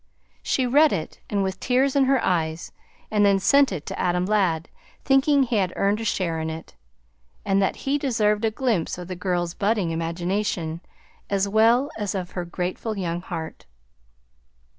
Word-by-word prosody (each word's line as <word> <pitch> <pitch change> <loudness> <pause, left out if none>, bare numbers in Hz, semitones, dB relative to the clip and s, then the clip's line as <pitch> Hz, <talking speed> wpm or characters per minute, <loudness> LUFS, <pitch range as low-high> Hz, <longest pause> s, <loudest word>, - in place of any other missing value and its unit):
She 260 - 0
read 290 +5 +5
it 155 - -4
with 190 -2 -1
tears 265 +2 +1
in 275 -1 +4
her 270 0 +3
eyes 160 -2 -1 0.4
and 210 -1 +3
then 200 -1 +5
sent 275 +7 +4
it 160 -6 -5
to - - -6
Adam 180 0 +1
Ladd, 185 -6 +1 0.4
thinking 270 +1 +4
he 240 -3 0
had 185 -3 +1
earned 205 +2 +1
a - - -3
share 175 -6 -1
in 160 0 -3
it, 160 0 -8 0.7
and 195 -1 +2
that 195 - +1
he 280 +2 +1
deserved 220 -6 +1
a 225 - +3
glimpse 220 -8 -1
of 180 -1 -7
the 185 - -5
girl's 175 -2 -1
budding 200 -4 0
imagination, 170 0 -2 0.5
as 200 0 +1
well 230 +7 +3
as 205 -2 -2
of 185 -1 -4
her 180 -1 -4
grateful 180 +5 -4
young 175 -2 -2
heart. 165 -3 -7
195 Hz, 170 wpm, -24 LUFS, 175-230 Hz, 0.7 s, read